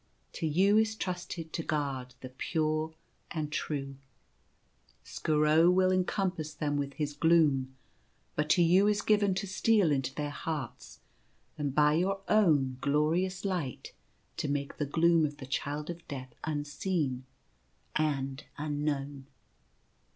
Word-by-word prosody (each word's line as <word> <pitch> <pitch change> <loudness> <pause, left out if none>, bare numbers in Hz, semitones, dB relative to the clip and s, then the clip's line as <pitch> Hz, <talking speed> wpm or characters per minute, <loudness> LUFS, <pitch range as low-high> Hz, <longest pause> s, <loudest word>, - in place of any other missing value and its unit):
To 160 - -2
you 195 +7 +4
is 220 0 +1
trusted 175 -4 -5
to - - -1
guard 135 -5 -3
the 130 - -7
pure 155 +4 -1 0.3
and 155 -3 -3
true. 140 -3 -3 1.1
Skooro 155 +2 +3
will 185 0 +3
ea 185 0 +3
compass 180 -6 -2
them 145 -1 -1
with 140 -1 -2
his 150 -2 -2
gloom; 145 -5 +3 0.6
but 150 0 -1
to 175 +1 +5
you 185 +4 +5
is 205 -1 +1
given 205 -3 +3
to 195 - -2
steal 200 -2 +3
into 135 -1 -1
their 145 0 -3
hearts 145 -4 -6 0.5
and 145 -2 -3
by 150 0 +5
your 190 +4 0
own 145 -11 +3
glorious 165 +7 +1
light 175 -10 -3 0.4
to - - -2
make 140 -1 -2
the 150 - -1
gloom 165 +2 +4
of 145 -1 -2
the 130 - -8
Child 145 +4 -3
of 170 0 -11
Death 130 -3 -7
unseen 145 -2 -2 0.7
and 140 -3 -1
un 150 0 -3
known. 140 -2 -3
155 Hz, 140 wpm, -30 LUFS, 145-175 Hz, 1.1 s, to